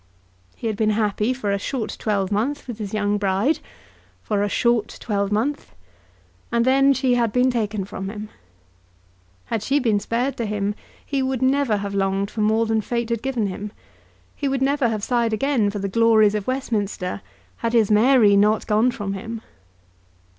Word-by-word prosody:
He - - -9
had 220 -2 0
been 215 0 +2
happy 210 +1 +1
for 245 -6 -2
a 200 - 0
short 225 0 -3
twelvemonth 210 +8 -1
with 235 -3 -6
his 205 -2 -5
young 205 -1 0
bride, 200 +9 +1 0.6
for 205 -2 0
a 205 - 0
short 235 0 +1
twelvemonth, 210 +7 -2 0.8
and 235 0 +2
then 270 +1 +5
she 260 -2 +2
had 235 -3 +2
been 250 +3 +3
taken 215 -4 -2
from 195 -1 -6
him. 210 0 -7 1.2
Had 225 - -2
she 270 +7 +1
been 225 -7 +2
spared 245 +6 -2
to 230 - -2
him 205 -1 -1 0.3
he 275 -2 -1
would 260 -1 -1
never 265 -4 +2
have 200 0 -4
longed 195 0 0
for 220 - -3
more 220 +2 +2
than 220 0 +1
Fate 235 +1 -2
had 230 -2 -1
given 255 -5 -1
him. 200 +2 -5 0.6
He 285 - -2
would 270 -1 0
never 275 -2 +2
have 215 -2 -3
sighed 235 -2 +1
again 240 -2 +1
for 205 - -4
the 200 0 -2
glories 220 0 +4
of 210 -2 -3
Westminster 205 - -2 0.4
had 230 0 -2
his 220 -3 +3
Mary 215 -1 +5
not 210 +2 +3
gone 220 +3 +3
from 205 -5 -4
him. 220 +3 -6
220 Hz, 175 wpm, -22 LUFS, 205-250 Hz, 1.2 s, then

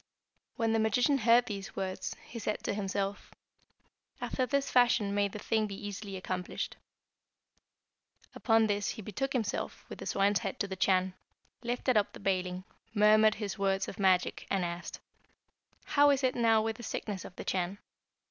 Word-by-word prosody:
"When 225 -1 +1
the 225 - +2
magician 245 +6 +3
heard 235 +1 +5
these 200 0 -6
words, 190 -1 -3
he 230 - -8
said 215 -1 -3
to - - -1
himself, 200 0 -3 0.9
'After 255 -1 -1
this 280 0 0
fashion 240 -5 +4
may 205 0 +2
the 200 - -8
thing 220 0 0
be 200 - -6
easily 205 -1 -6
accomplished.' 185 -1 -4 1.6
Upon 225 -2 +3
this 205 -1 0
he 220 - -5
betook 265 +8 -3
himself, 225 -5 -2
with - - -8
the - - -6
swine's 200 0 +2
head 195 - -4
to 200 - 0
the 190 - -5
Chan, 185 -1 +2 0.5
lifted 245 0 0
up 205 - +1
the - - -10
baling, 185 -2 -1 0.3
murmured 215 +1 +6
his 205 -1 -5
words 195 -1 +1
of - - -8
magic, 185 -2 +2
and 190 -2 +1
asked, 170 0 -5 0.8
'How 290 0 +4
is 280 -1 +2
it 255 -1 +3
now 225 -2 +3
with 220 0 -2
the - - -9
sickness 205 -4 -4
of 180 - -10
the - - -7
Chan?' 185 +1 -1
205 Hz, 170 wpm, -31 LUFS, 195-225 Hz, 1.6 s, murmured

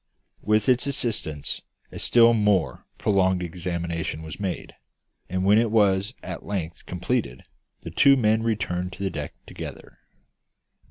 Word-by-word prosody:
With 105 0 +2
its 125 +1 +3
assistance 110 - -2 0.3
a - - -7
still 115 0 +5
more 105 -6 +1
prolonged 95 -3 +2
examination 85 -2 -3
was 80 +1 -8
made; 95 -3 -4 0.6
and 95 +1 -1
when 105 +2 +6
it 115 -1 +2
was 105 +1 +2
at - - -6
length 90 -5 -5
completed, 90 - -2 0.4
the - - -7
two 140 0 +6
men 110 -2 +3
returned 95 -5 -1
to 100 - -6
the 95 - -1
deck - - -5
together. - - -9
100 Hz, 140 wpm, -25 LUFS, 90-110 Hz, 0.6 s, when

